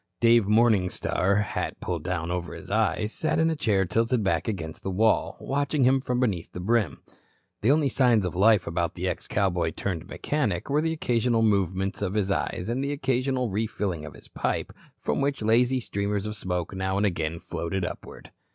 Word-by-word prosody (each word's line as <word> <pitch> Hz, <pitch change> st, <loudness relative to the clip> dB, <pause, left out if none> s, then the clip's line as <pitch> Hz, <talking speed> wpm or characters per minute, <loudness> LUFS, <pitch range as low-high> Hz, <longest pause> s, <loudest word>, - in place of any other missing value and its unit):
Dave 115 Hz, -2 st, +5 dB
Morningstar, 105 Hz, -2 st, +2 dB
hat -, -, -4 dB
pulled -, -, -3 dB
down 85 Hz, -2 st, -2 dB
over 90 Hz, -1 st, -3 dB
his -, -, -10 dB
eyes, 110 Hz, 0 st, +1 dB
sat 155 Hz, -, 0 dB
in 160 Hz, 0 st, +3 dB
a -, -, -1 dB
chair 100 Hz, -9 st, +1 dB
tilted 115 Hz, +4 st, +1 dB
back 85 Hz, -4 st, 0 dB
against 80 Hz, -7 st, -4 dB
the -, -, -4 dB
wall, 110 Hz, +4 st, +2 dB
watching 140 Hz, 0 st, 0 dB
him 130 Hz, +1 st, +4 dB
from 125 Hz, -2 st, -1 dB
beneath 100 Hz, -10 st, -1 dB
the -, -, -6 dB
brim. 100 Hz, -5 st, 0 dB, 0.6 s
The 110 Hz, -, +2 dB
only 150 Hz, 0 st, +4 dB
signs 120 Hz, -6 st, +3 dB
of 90 Hz, -, -3 dB
life 100 Hz, 0 st, +4 dB
about 85 Hz, -1 st, -2 dB
the -, -, -2 dB
ex -, -, -3 dB
cowboy 90 Hz, -5 st, 0 dB
turned 90 Hz, -3 st, -3 dB
mechanic 130 Hz, -, -2 dB
were 150 Hz, +2 st, +3 dB
the 160 Hz, +1 st, 0 dB
occasional 120 Hz, -6 st, +1 dB
movements 95 Hz, -2 st, +1 dB
of 95 Hz, -2 st, -1 dB
the 100 Hz, -2 st, +1 dB
eyes, 90 Hz, +3 st, -3 dB
and 125 Hz, +4 st, -1 dB
the 140 Hz, +1 st, -1 dB
occasional 130 Hz, -3 st, 0 dB
refilling 100 Hz, -5 st, -2 dB
of 75 Hz, -, -9 dB
his -, -, -15 dB
pipe, -, -, -2 dB, 0.2 s
from -, -, -1 dB
which 140 Hz, -4 st, -1 dB
lazy 120 Hz, +4 st, +3 dB
streamers 100 Hz, -2 st, -2 dB
of 105 Hz, 0 st, -4 dB
smoke 90 Hz, -2 st, -3 dB
now 95 Hz, 0 st, -1 dB
and 100 Hz, -, +2 dB
again 85 Hz, -3 st, -1 dB
floated 90 Hz, +3 st, -3 dB
upward. -, -, -8 dB
105 Hz, 190 wpm, -26 LUFS, 90-125 Hz, 0.6 s, Dave